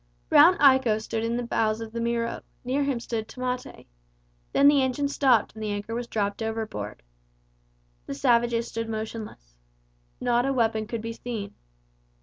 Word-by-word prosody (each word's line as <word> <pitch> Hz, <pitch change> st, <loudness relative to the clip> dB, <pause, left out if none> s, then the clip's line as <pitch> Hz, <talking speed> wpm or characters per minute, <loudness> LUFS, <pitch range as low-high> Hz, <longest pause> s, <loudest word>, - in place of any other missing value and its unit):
Brown 340 Hz, +5 st, +7 dB
Iko 260 Hz, -6 st, +5 dB
stood 220 Hz, 0 st, -3 dB
in 230 Hz, +1 st, -1 dB
the 245 Hz, -, -2 dB
bows 220 Hz, -2 st, 0 dB
of 225 Hz, -1 st, -7 dB
the 230 Hz, 0 st, -4 dB
Miro; 235 Hz, 0 st, -1 dB, 0.2 s
near 265 Hz, +3 st, 0 dB
him 275 Hz, -3 st, -1 dB
stood 230 Hz, -2 st, -4 dB
Tamate. 255 Hz, 0 st, -5 dB, 0.7 s
Then 280 Hz, -, +5 dB
the 285 Hz, -1 st, +6 dB
engine 260 Hz, +2 st, 0 dB
stopped 265 Hz, -6 st, +2 dB
and 220 Hz, -, -10 dB
the 215 Hz, -, -2 dB
anchor 205 Hz, +2 st, -4 dB
was 240 Hz, +1 st, -3 dB
dropped 205 Hz, -2 st, -2 dB
overboard. 215 Hz, -, -4 dB, 1.0 s
The -, -, -4 dB
savages 235 Hz, -, +2 dB
stood 230 Hz, 0 st, -4 dB
motionless. 215 Hz, -, -6 dB, 0.7 s
Not 245 Hz, +1 st, +1 dB
a 275 Hz, -, +1 dB
weapon 225 Hz, -3 st, +1 dB
could 230 Hz, 0 st, -4 dB
be 230 Hz, 0 st, -4 dB
seen. 225 Hz, -4 st, -6 dB
230 Hz, 160 wpm, -26 LUFS, 220-250 Hz, 1.0 s, Brown